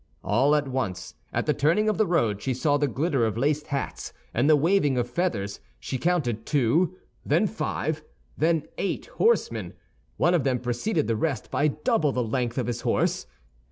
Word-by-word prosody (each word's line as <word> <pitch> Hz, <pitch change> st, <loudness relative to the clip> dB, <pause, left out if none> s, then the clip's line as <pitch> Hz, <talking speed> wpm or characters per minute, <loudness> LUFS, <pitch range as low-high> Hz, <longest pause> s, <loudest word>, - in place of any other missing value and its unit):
All 135 Hz, +8 st, +3 dB
at 145 Hz, -1 st, 0 dB
once, 110 Hz, -9 st, -3 dB, 0.2 s
at -, -, -1 dB
the -, -, +2 dB
turning 170 Hz, +9 st, +2 dB
of 215 Hz, -, +1 dB
the 215 Hz, -, +3 dB
road 115 Hz, -, +1 dB
she 130 Hz, -2 st, -1 dB
saw 145 Hz, +3 st, +2 dB
the 145 Hz, 0 st, +1 dB
glitter 135 Hz, 0 st, 0 dB
of 110 Hz, -1 st, 0 dB
laced 150 Hz, +4 st, 0 dB
hats 140 Hz, -1 st, -4 dB, 0.2 s
and 125 Hz, +6 st, +2 dB
the 155 Hz, -, +7 dB
waving 150 Hz, -3 st, +2 dB
of 120 Hz, -1 st, 0 dB
feathers; 115 Hz, -, -2 dB, 0.2 s
she 130 Hz, -, -4 dB
counted 140 Hz, -11 st, 0 dB
two, 150 Hz, +7 st, +2 dB, 0.3 s
then -, -, +2 dB
five, 160 Hz, -7 st, -2 dB, 0.3 s
then 160 Hz, -1 st, +2 dB, 0.2 s
eight 195 Hz, -, -2 dB
horsemen. 465 Hz, +1 st, +1 dB, 0.4 s
One 175 Hz, -, +3 dB
of 170 Hz, -6 st, +2 dB
them 130 Hz, -2 st, +1 dB
preceded 125 Hz, -, -1 dB
the 115 Hz, -, 0 dB
rest 135 Hz, 0 st, -2 dB
by 150 Hz, -, +2 dB
double 150 Hz, -, +1 dB
the 125 Hz, -2 st, 0 dB
length 120 Hz, +1 st, -2 dB
of 130 Hz, -, 0 dB
his 120 Hz, -1 st, -3 dB
horse. -, -, 0 dB
140 Hz, 185 wpm, -26 LUFS, 120-165 Hz, 0.4 s, the